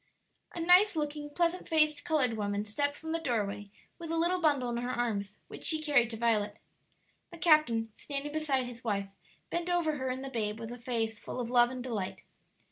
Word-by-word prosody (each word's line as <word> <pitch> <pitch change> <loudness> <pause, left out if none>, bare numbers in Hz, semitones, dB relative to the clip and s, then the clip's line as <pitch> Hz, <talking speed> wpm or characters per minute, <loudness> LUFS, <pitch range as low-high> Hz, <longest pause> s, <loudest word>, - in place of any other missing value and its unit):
A - - -4
nice 360 +4 +6
looking, 295 -1 -3
pleasant 340 +4 0
faced 305 -2 +3
colored 300 -8 +2
woman 205 -1 -2
stepped 285 +7 -1
from 320 +1 -7
the 330 - 0
doorway 205 -8 -2 0.3
with 335 -1 -7
a 330 - 0
little 350 +2 +2
bundle 280 -6 +2
in 235 - -2
her 245 +1 -3
arms, 215 -5 -2
which - - -10
she 315 - +3
carried 285 -7 +3
to 225 - -5
Violet. 215 -2 +1 0.7
The 340 - -11
captain, 305 -10 +3
standing 285 0 -4
beside 290 -4 0
his 245 0 -9
wife, 200 -3 -1 0.4
bent 345 +1 -2
over 335 -4 +1
her 260 -1 -2
and 260 +1 -3
the 270 - -6
babe 215 -3 -2
with 225 0 -6
a 245 - -8
face 225 -2 -1
full - - -6
of 240 -1 -3
love 240 -1 +5
and 255 -1 -6
delight. 215 -7 -4
255 Hz, 205 wpm, -31 LUFS, 225-310 Hz, 0.7 s, nice